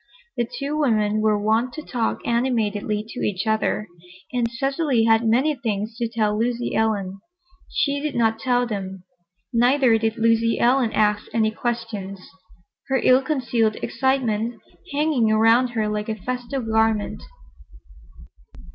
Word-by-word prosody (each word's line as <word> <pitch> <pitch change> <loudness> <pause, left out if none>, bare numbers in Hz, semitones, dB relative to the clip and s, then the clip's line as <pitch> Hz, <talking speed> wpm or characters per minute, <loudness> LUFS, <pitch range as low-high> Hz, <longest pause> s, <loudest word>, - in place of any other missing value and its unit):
The 235 -1 -1
two 285 +2 -3
women 215 -6 +1
were 215 -1 +2
wont 220 +4 0
to 310 - -6
talk 235 -5 -2
animatedly 215 -3 0
to 250 - -7
each 195 +1 -2
other, 220 -1 0 0.5
and 240 -2 0
Cecily 270 0 0
had 225 0 +4
many 260 +7 +3
things 220 -4 -3
to 235 - -1
tell 215 -2 0
Lucy 235 +2 -1
Ellen. 200 -3 -1 0.5
She 285 0 0
did 300 0 -3
not 225 -1 +1
tell 245 0 +1
them. 190 -4 -5 0.5
Neither 245 0 +4
did 225 0 -1
Lucy 230 0 +2
Ellen 245 -1 +3
ask 210 -1 +2
any 220 -1 +2
questions, 220 -4 -4 0.7
her 270 - +1
ill 255 +1 +5
concealed 245 -6 0
excitement 235 -3 0 0.3
hanging 285 -6 +1
around 225 +3 +4
her 215 -1 +1
like 210 +1 -3
a 220 - -1
festal 250 +4 -4
garment. 220 -1 0
230 Hz, 140 wpm, -22 LUFS, 215-250 Hz, 0.7 s, ill